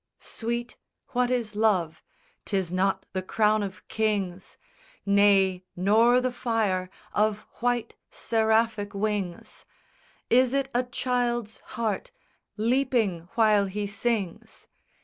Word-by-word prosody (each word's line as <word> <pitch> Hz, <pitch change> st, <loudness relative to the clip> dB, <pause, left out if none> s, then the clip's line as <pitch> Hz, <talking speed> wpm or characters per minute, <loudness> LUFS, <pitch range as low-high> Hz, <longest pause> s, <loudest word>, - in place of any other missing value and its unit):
SONG -, -, -59 dB
I -, -, -16 dB
Sweet, 235 Hz, +1 st, -3 dB, 0.3 s
what 250 Hz, 0 st, +1 dB
is 235 Hz, -4 st, -1 dB
love? 195 Hz, -7 st, +1 dB, 0.4 s
'Tis 190 Hz, -3 st, -1 dB
not 190 Hz, +1 st, +1 dB
the 185 Hz, -, -1 dB
crown 215 Hz, +3 st, +2 dB
of 190 Hz, -2 st, -6 dB
kings, 200 Hz, -4 st, -2 dB, 0.5 s
Nay, 200 Hz, -2 st, +4 dB
nor 225 Hz, +7 st, +4 dB
the 255 Hz, 0 st, -1 dB
fire 220 Hz, -7 st, -1 dB, 0.2 s
of 210 Hz, 0 st, +1 dB, 0.2 s
white 240 Hz, -1 st, -1 dB
seraphic 220 Hz, -2 st, +1 dB
wings! 200 Hz, -4 st, -3 dB, 0.6 s
Is 255 Hz, +2 st, +4 dB
it 275 Hz, -1 st, 0 dB
a 245 Hz, -, +3 dB
child's 245 Hz, -3 st, -2 dB, 0.2 s
heart 230 Hz, -, -2 dB, 0.5 s
leaping 220 Hz, -7 st, +1 dB
while 215 Hz, -3 st, +4 dB
he 205 Hz, +2 st, -3 dB
sings? 205 Hz, -3 st, -3 dB
215 Hz, 115 wpm, -26 LUFS, 195-240 Hz, 0.6 s, Nay